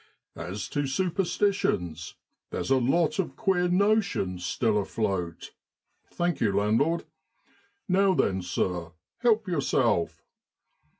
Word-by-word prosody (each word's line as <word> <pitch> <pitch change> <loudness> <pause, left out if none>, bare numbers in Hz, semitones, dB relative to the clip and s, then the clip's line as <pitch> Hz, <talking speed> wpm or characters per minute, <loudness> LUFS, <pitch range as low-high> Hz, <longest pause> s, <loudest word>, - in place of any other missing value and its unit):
1 80 - -7
As 100 +3 -4
to 145 -1 -1
superstitions, 175 - 0 0.3
there's - - -3
a 135 - +6
lot 170 - +1
of 190 - -1
queer 185 -4 +1
notions 180 - +1
still 110 +3 +1
afloat 95 -5 -3 0.6
(thank 175 -1 -1
you, 105 - +3
landlord) 110 +12 +1 0.8
Now 190 0 +3
then, 95 -9 +1
sir, 90 -2 -2 0.3
help 225 -3 +2
yourself. 130 - +1
135 Hz, 110 wpm, -27 LUFS, -, 0.8 s, a